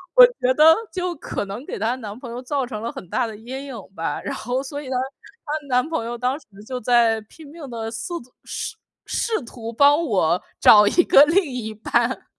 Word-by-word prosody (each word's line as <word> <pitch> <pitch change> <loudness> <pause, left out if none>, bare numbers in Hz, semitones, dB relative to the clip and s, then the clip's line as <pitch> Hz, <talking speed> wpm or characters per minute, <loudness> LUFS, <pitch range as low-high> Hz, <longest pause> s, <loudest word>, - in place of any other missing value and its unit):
我 - - +11
觉 260 - 0
得 315 +2 +8 0.2
就 360 -1 -2
可 - - -4
能 210 +8 -7
给 - - -5
她 230 +4 0
男 215 -3 -8
朋 240 -3 -8
友 245 - -6
造 270 0 -2
成 215 -4 -6
了 230 - -3
很 180 - -10
大 250 -2 0
的 220 - -8
阴 260 +5 -7
影 265 - -7 0.2
吧。 165 - -3
然 280 - -4
后 255 +1 -2
所 285 +2 -6
以 275 - -10
呢， 260 - -2 0.5
她 300 -1 -4
男 250 +3 +2
朋 320 -8 -2
友 240 +1 -4
当 255 +4 -1
时 - - -23 0.2
就 255 -1 -4
在 230 -1 +3
拼 295 +8 -15
命 310 -4 -9
地 225 -2 -5
四 235 +10 -5
图 250 +1 -19
试 - - -5 0.3
试 450 -1 -1
图 230 -1 -8
帮 290 +6 +5
我 180 - +1 0.2
找 210 -1 +8
一 350 +10 +4
个 280 - +7
另 350 +6 +3
一 245 -5 -5
半。 240 +3 0
250 Hz, 235 characters per minute, -22 LUFS, 225-290 Hz, 0.5 s, 我